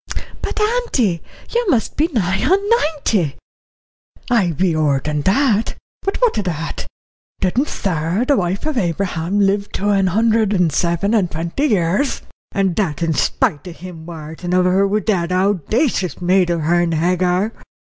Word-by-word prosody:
"But, -, -, -3 dB
auntie, 425 Hz, -, +1 dB, 0.3 s
you 475 Hz, -3 st, +1 dB
must 235 Hz, -, +1 dB
be 310 Hz, -, +2 dB
nigh 190 Hz, -, 0 dB
on 370 Hz, +8 st, +4 dB
ninety." 290 Hz, -, +1 dB, 1.0 s
"I 215 Hz, -7 st, +3 dB
be 170 Hz, +1 st, 0 dB
ower 150 Hz, -3 st, +2 dB
that. 200 Hz, -, +1 dB, 0.3 s
But 390 Hz, -, -2 dB
what 485 Hz, -, +2 dB
o' -, -, +1 dB
that? 165 Hz, -4 st, -4 dB, 0.5 s
Didn't 240 Hz, +10 st, +1 dB
Sarah, 175 Hz, +4 st, -1 dB
the 285 Hz, -, +3 dB
wife 185 Hz, +1 st, -1 dB
of 305 Hz, -5 st, 0 dB
Abraham, 180 Hz, 0 st, -1 dB
live 200 Hz, 0 st, +1 dB
to 205 Hz, +2 st, -1 dB
an 195 Hz, -2 st, +3 dB
hundred 220 Hz, +2 st, +2 dB
and 180 Hz, -6 st, +2 dB
seven 170 Hz, +6 st, +1 dB
and 200 Hz, -6 st, +2 dB
twenty 170 Hz, -, -2 dB
years, 200 Hz, -, +1 dB, 0.3 s
and 195 Hz, -4 st, 0 dB
that 170 Hz, -7 st, -1 dB
in 165 Hz, -1 st, +1 dB
spite 145 Hz, +2 st, 0 dB
of 175 Hz, -, -8 dB
him 170 Hz, -3 st, -10 dB
worritin' 165 Hz, +2 st, -5 dB
of 185 Hz, 0 st, +3 dB
her 190 Hz, +2 st, +3 dB
wi' 210 Hz, +2 st, 0 dB
that 180 Hz, -6 st, 0 dB
owdacious 195 Hz, -, 0 dB
maid 180 Hz, 0 st, +2 dB
of 170 Hz, -1 st, 0 dB
hern, 170 Hz, +2 st, +2 dB
Hagar? 180 Hz, +5 st, +1 dB
190 Hz, 155 wpm, -19 LUFS, 170-220 Hz, 1.0 s, on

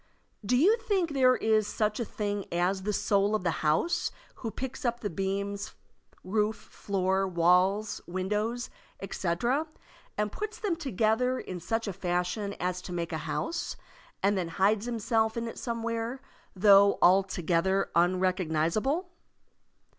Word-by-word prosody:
Do 245 Hz, +5 st, +2 dB
you 395 Hz, -, +5 dB
think 400 Hz, -8 st, 0 dB
there 255 Hz, -2 st, +4 dB
is 215 Hz, -2 st, +2 dB
such 210 Hz, +1 st, -1 dB
a 235 Hz, -, -1 dB
thing 205 Hz, -1 st, -4 dB
as 180 Hz, +3 st, +1 dB
the 210 Hz, +2 st, -1 dB
soul 205 Hz, 0 st, +2 dB
of 215 Hz, -, -2 dB
the 170 Hz, -, +1 dB
house 160 Hz, -, +1 dB, 0.3 s
who 230 Hz, -, -4 dB
picks 260 Hz, +5 st, -6 dB
up 240 Hz, -1 st, 0 dB
the 205 Hz, -, -3 dB
beams, 200 Hz, +3 st, -3 dB, 0.5 s
roof, 210 Hz, +3 st, 0 dB
floor, 190 Hz, -1 st, -1 dB
walls, 185 Hz, +4 st, +2 dB
windows, 210 Hz, +6 st, -2 dB, 0.3 s
etc., 215 Hz, -, -1 dB, 0.5 s
and 210 Hz, 0 st, 0 dB
puts 430 Hz, -, -5 dB
them 405 Hz, -7 st, -1 dB
together 250 Hz, -, +1 dB
in 180 Hz, -1 st, -6 dB
such 225 Hz, +6 st, -2 dB
a 200 Hz, -, -2 dB
fashion 180 Hz, +3 st, -2 dB
as 180 Hz, 0 st, -2 dB
to 180 Hz, -, -8 dB
make 170 Hz, -1 st, -3 dB
a -, -, 0 dB
house, 335 Hz, +1 st, -2 dB, 0.5 s
and 200 Hz, +1 st, +3 dB
then 185 Hz, -3 st, -1 dB
hides 200 Hz, +6 st, +1 dB
himself 225 Hz, -1 st, 0 dB
in 230 Hz, 0 st, -2 dB
it 230 Hz, -, -7 dB
somewhere, 230 Hz, +1 st, -3 dB, 0.4 s
though 200 Hz, +1 st, +6 dB
altogether 190 Hz, 0 st, +2 dB
unrecognizable? 185 Hz, -, +1 dB
205 Hz, 140 wpm, -29 LUFS, 185-235 Hz, 0.5 s, though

